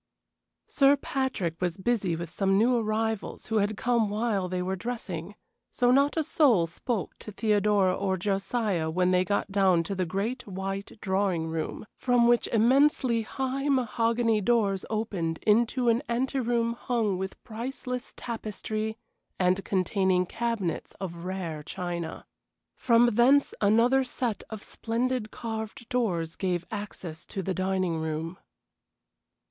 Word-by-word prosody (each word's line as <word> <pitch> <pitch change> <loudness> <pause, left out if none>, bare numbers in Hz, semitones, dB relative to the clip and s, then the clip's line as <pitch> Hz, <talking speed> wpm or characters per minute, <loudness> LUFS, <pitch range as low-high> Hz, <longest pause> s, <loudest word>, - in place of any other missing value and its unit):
Sir 280 0 +4
Patrick 260 - -2
was 180 -1 -1
busy 190 -4 0
with 165 0 -6
some 195 +1 +2
new 240 +4 +4
arrivals 220 -1 -1
who 225 -2 0
had 205 0 +1
come 235 -3 +1
while 205 -3 0
they 180 0 -1
were 190 +1 -1
dressing, 235 +5 -5 0.3
so 245 -1 +2
not 280 +4 +3
a 320 - +2
soul 250 - +4
spoke 185 +3 -3
to 215 - -8
Theodora 205 -3 +2
or 190 -1 -1
Josiah 195 -2 -1
when 180 +2 +2
they 180 0 +4
got 200 +1 -1
down 190 -4 +3
to 180 - -4
the 185 -2 -1
great, 215 +8 -3
white 195 +1 -4
drawing 190 -4 0
room, 160 +5 -4
from 245 -2 +3
which 240 0 +3
immensely 245 +1 +3
high 265 +5 -2
mahogany 230 -3 +2
doors 200 -3 +1
opened 195 -7 -2
into 235 +3 +3
an 230 +1 +4
anteroom 240 -1 0
hung 225 -5 -1
with 190 0 -6
priceless 250 +2 -5
tapestry 220 -1 -4 0.4
and 185 +1 +2
containing 185 -1 +1
cabinets 225 -5 -2
of 170 -2 -6
rare 180 -5 -4
china. 170 +1 -5 0.5
From 235 -1 +4
thence 265 +6 +4
another 230 +6 +4
set 245 -3 -3
of 220 -2 -7
splendid 235 0 -2
carved 220 0 -6
doors 175 -10 -1
gave 180 -2 -1
access 195 -6 -6
to 195 - -4
the 190 - -1
dining 185 -3 0
room. 160 +2 -4
210 Hz, 140 wpm, -28 LUFS, 185-235 Hz, 0.5 s, Sir